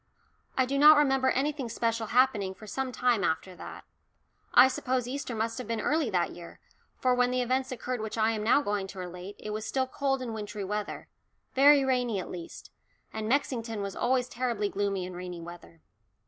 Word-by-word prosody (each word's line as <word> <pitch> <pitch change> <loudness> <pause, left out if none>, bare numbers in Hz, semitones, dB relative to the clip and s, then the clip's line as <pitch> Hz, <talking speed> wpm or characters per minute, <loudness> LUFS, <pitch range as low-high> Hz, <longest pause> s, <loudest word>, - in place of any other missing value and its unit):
I 260 - +4
do 275 +2 -1
not 305 +1 +9
remember 270 -3 +3
anything 275 -1 -1
special 230 0 -1
happening 220 -6 +2
for 215 - -12
some 260 +4 -3
time 240 -3 +1
after 175 +3 -1
that. - - -9 0.7
I 260 - +8
suppose 255 -1 -1
Easter 260 -2 -4
must 225 +2 -2
have 250 - -6
been 230 -1 -2
early 295 +2 +1
that 180 -4 0
year, 170 -1 -11 0.4
for 255 -1 +2
when 250 0 +3
the 250 0 +1
events 260 +2 -1
occurred 250 -1 -3
which 220 +1 -5
I 220 0 +3
am 215 -2 -2
now 250 +6 +4
going 205 -3 -1
to 195 - -11
relate, 180 +2 -7
it 210 - -7
was 215 +1 -3
still 265 -1 0
cold 270 0 -1
and 235 -3 -4
wintry 210 -1 -5
weather 210 +2 -4 0.5
very 280 +1 +6
rainy 250 -5 +1
at 185 - -6
least, 175 -2 -9 0.4
and 220 0 -3
Mexington 230 -5 -1
was 195 -1 -5
always 250 0 +1
terribly 235 -4 -1
gloomy 195 -2 -1
in 185 - -7
rainy 180 -1 -6
weather. 170 -1 -11
230 Hz, 195 wpm, -29 LUFS, 205-260 Hz, 0.7 s, not